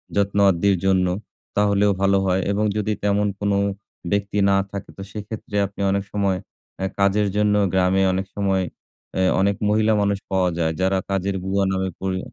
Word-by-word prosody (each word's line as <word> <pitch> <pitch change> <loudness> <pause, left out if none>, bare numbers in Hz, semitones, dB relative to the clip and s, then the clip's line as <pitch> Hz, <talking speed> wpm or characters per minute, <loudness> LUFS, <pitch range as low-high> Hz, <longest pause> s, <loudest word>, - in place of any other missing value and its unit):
যত্ন 100 0 +1
আদ্যির 95 +2 +2
জন্য 95 -1 +3 0.5
তাহলেও 100 0 +3
ভালো 100 0 +4
হয় 95 0 +1
এবং 105 +2 +1
যদি 105 +1 0
তেমন 105 0 +2
কোন 100 0 0 0.6
ব্যক্তি 100 0 -1
না 100 - +4 0.2
থাকে, 100 -1 -6
তো 95 - -7
সেক্ষেত্রে 105 0 -7
আপনি 100 0 -9
অনেক 100 0 0
সময় 100 -2 +1 0.4
আ - - -1 0.2
কাজের 100 +1 +3
জন্য 105 0 +3 0.2
গ্রামে 95 +1 +3
অনেক 95 +1 -1
সময় 95 -2 +1 0.6
আ - - +3 0.2
অনেক 100 0 +2
মহিলা 110 +1 +3
মানুষ 100 -1 +1
পাওয়া 95 -1 +2
যায়। 80 -1 +1
যারা 95 +1 +2
কাজের 95 0 -1
বুয়া 95 +1 +1
নামে 95 0 -1
পরি 95 -1 -1
100 Hz, 170 wpm, -22 LUFS, 95-100 Hz, 0.6 s, ভালো